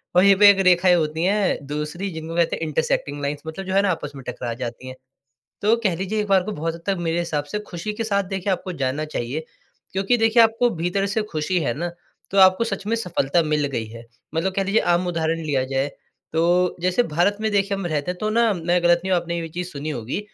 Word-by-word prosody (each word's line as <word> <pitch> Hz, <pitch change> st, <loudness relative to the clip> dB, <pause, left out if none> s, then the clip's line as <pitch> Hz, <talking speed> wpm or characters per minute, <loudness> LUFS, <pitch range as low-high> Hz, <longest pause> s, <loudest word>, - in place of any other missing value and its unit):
और 180 Hz, -, +6 dB
यहीं 200 Hz, 0 st, +7 dB
पे 205 Hz, 0 st, +9 dB
एक 200 Hz, -, +5 dB
रेखाएँ 180 Hz, 0 st, +5 dB
होती 160 Hz, -1 st, -1 dB
हैं 200 Hz, +1 st, +2 dB
दूसरी 150 Hz, +6 st, -4 dB
जिनको 160 Hz, 0 st, -6 dB
कहते 170 Hz, -1 st, +2 dB
हैं -, -, -5 dB
इंटरसेक्टिंग 145 Hz, -1 st, -1 dB
लाइन्स 145 Hz, +1 st, -3 dB
मतलब 175 Hz, +5 st, -6 dB
जो 190 Hz, -, -3 dB
है 195 Hz, -, +5 dB
ना 200 Hz, -, +1 dB
आपस 150 Hz, -4 st, -4 dB
में 135 Hz, -, -9 dB
टकरा 125 Hz, -1 st, -4 dB
जाती 125 Hz, +1 st, -5 dB
हैं। 130 Hz, -, -7 dB, 0.7 s
तो 215 Hz, +3 st, +4 dB
कह 190 Hz, -5 st, +2 dB
लीजिए 195 Hz, +5 st, -2 dB
एक 210 Hz, -, -4 dB
बार 195 Hz, -2 st, +4 dB
को 215 Hz, -, -4 dB
बहुत 165 Hz, -2 st, -3 dB
हद 170 Hz, -, -12 dB
तक 195 Hz, -1 st, 0 dB
मेरे 165 Hz, +1 st, 0 dB
हिसाब 155 Hz, -4 st, -1 dB
से 210 Hz, -, -1 dB
खुशी 180 Hz, +5 st, -4 dB
के 225 Hz, -, -3 dB
साथ 200 Hz, -2 st, +1 dB
देखिए 195 Hz, +1 st, -3 dB
आपको 185 Hz, 0 st, -5 dB
जाना 140 Hz, +4 st, -1 dB
चाहिए, 150 Hz, +2 st, -4 dB, 0.5 s
क्योंकि 195 Hz, +6 st, +1 dB
देखिए 225 Hz, +1 st, +5 dB
आपको 225 Hz, +2 st, +3 dB
भीतर 180 Hz, +3 st, -1 dB
से 210 Hz, +2 st, 0 dB
खुशी 155 Hz, +3 st, 0 dB
है 140 Hz, -7 st, -1 dB
ना, 170 Hz, +6 st, -3 dB, 0.4 s
तो 200 Hz, -, -1 dB
आपको 190 Hz, +3 st, +6 dB
सच 200 Hz, -3 st, -4 dB
में 225 Hz, -, +1 dB
सफलता 175 Hz, -7 st, 0 dB
मिल 150 Hz, -1 st, +1 dB
गई 115 Hz, -5 st, -3 dB
है। 115 Hz, +1 st, -11 dB, 0.3 s
मतलब 185 Hz, +4 st, 0 dB
कह 195 Hz, -, +1 dB
लीजिए 200 Hz, +3 st, +2 dB
आम 175 Hz, +1 st, +1 dB
उदाहरण 165 Hz, -1 st, -1 dB
लिया 140 Hz, -4 st, 0 dB
जाए, 135 Hz, +1 st, -1 dB, 0.5 s
तो 175 Hz, +2 st, +2 dB
जैसे 185 Hz, +7 st, +2 dB
भारत 175 Hz, +4 st, +1 dB
में 220 Hz, -, +1 dB
देखिए 200 Hz, 0 st, +1 dB
हम 195 Hz, -, -4 dB
रहते 155 Hz, +1 st, -1 dB
तो 215 Hz, +4 st, -3 dB
ना 230 Hz, +1 st, +3 dB
मैं 175 Hz, 0 st, 0 dB
गलत 175 Hz, 0 st, +4 dB
नहीं 190 Hz, -, -2 dB
हूँ 180 Hz, -, +4 dB
आपने 170 Hz, 0 st, -4 dB
ये 170 Hz, -, -2 dB
भी 165 Hz, -, -6 dB
चीज़ 175 Hz, +2 st, -5 dB
सुनी 145 Hz, +2 st, -5 dB
होगी, 125 Hz, -, -3 dB
175 Hz, 245 wpm, -22 LUFS, 155-195 Hz, 0.7 s, पे